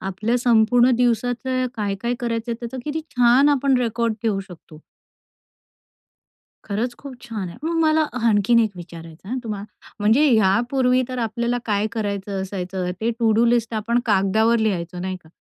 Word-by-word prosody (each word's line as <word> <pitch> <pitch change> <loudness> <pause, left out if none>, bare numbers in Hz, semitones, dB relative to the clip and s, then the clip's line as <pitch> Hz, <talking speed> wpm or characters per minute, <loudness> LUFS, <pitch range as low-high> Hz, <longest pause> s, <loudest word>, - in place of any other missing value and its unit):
आपल्या 210 +5 -1
संपूर्ण 240 +1 +4
दिवसाचं 245 +1 0
काय-काय 210 +3 -2
करायचंय? 235 0 -2
त्याचा 235 +2 -6
किती 305 +1 -3 0.2
छान 245 +4 +5
आपण 275 -2 +2
रेकॉर्ड 230 -1 -1
ठेवू 205 -4 0
शकतो. 160 -3 -14 1.8
खरंच 225 +4 -2
खूप 275 -2 -9
छान 210 -6 -5
आहे. 170 - -10
मग 335 +1 -1
मला 315 0 +3
अ, 250 - -4
हं 230 0 +2
आणखीन 210 +2 +3
एक 220 -2 +1
विचारायचं 165 0 -11
आहे 250 - -2
हं - - -2
तुम्हाला. 210 -2 -5 0.3
म्हणजे 225 +9 +4
ह्यापूर्वी 245 +5 +2
तर 255 -1 -5
आपल्याला 235 +2 -1
काय 210 0 +1
करायचं 200 -3 -3
असायचं 185 -1 -4
ते 230 +2 0
टू-डू 225 0 +3
लिस्ट 235 -1 +1
आपण 230 +3 0
कागदावर 220 +3 +2
लिहायचो 180 -5 -2
नाही 185 0 -3
का? - - -18
225 Hz, 160 wpm, -22 LUFS, 200-245 Hz, 1.8 s, छान